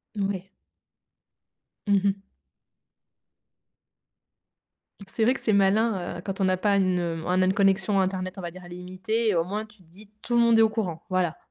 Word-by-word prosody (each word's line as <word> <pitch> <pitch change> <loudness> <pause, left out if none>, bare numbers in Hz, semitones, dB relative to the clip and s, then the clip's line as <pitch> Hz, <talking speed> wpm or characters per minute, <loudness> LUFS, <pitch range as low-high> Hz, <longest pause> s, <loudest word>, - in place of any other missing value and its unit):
Mouais. 195 -2 -3 1.4
Mmh 200 - +4
mh. 195 0 0 2.9
C'est 220 +3 -2
vrai 245 - +4
que - - -6
c'est 215 - 0
malin, 195 -2 +1
heu, - - -7
quand 195 0 -4
on - - +3
n'a 185 -1 +2
pas 200 +2 +2
une 185 -2 +2 0.3
un 180 +1 +1
même 185 0 +3
connexion 195 0 +2
internet, 185 0 -3
on - - -6
va 175 -1 -5
dire, 185 +1 -12
«illimitée» 185 +6 -3
et 205 - +1
au 165 0 +1
moins 210 +3 -4
tu 215 0 -21
te 185 - -22
dis, 195 +5 -17
tout 240 - -2
le 235 - +5
monde 230 -1 +5
est - - +7
au 220 - +5
courant, 190 -7 -3
voilà. 180 -3 0
195 Hz, 185 wpm, -26 LUFS, 185-210 Hz, 2.9 s, est